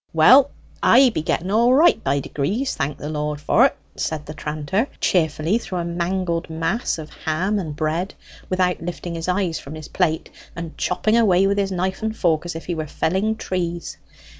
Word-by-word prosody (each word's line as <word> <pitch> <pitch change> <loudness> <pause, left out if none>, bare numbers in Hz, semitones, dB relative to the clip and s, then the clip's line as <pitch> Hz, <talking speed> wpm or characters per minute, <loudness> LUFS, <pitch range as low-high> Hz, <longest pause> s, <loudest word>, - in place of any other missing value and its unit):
"Well, 255 - +7 0.3
I 260 -1 +6
be 160 - -2
getting 170 +3 -1
all 235 +4 +4
right 320 -4 +4
by 140 +1 +1
degrees, 200 - -2
thank 140 +1 -2
the 145 - -6
Lord 150 -1 -3
for't!" 150 - +3 0.2
said 155 -1 -3
the 150 - -7
tranter 155 - -2
cheerfully 165 +3 +1
through 190 -5 -5
a 170 - -2
mangled 170 0 -2
mass 165 +9 -1
of 155 -1 -8
ham 185 +7 -1
and 155 -6 -5
bread, 160 +5 -2 0.3
without 185 -1 +1
lifting 175 0 -5
his 165 0 -4
eyes 180 -3 0
from 140 +3 -9
his 155 -1 -9
plate, 160 -3 0 0.2
and 170 -2 -6
chopping 215 +5 +1
away 195 -5 +4
with 200 +1 +1
his 195 -1 0
knife 190 +2 -2
and 220 0 -2
fork 165 -2 +1
as 175 - -5
if 165 - -7
he 175 - -2
were 155 -2 -4
felling 190 +9 0
trees. 175 -4 -4
175 Hz, 190 wpm, -22 LUFS, 155-195 Hz, 0.3 s, Well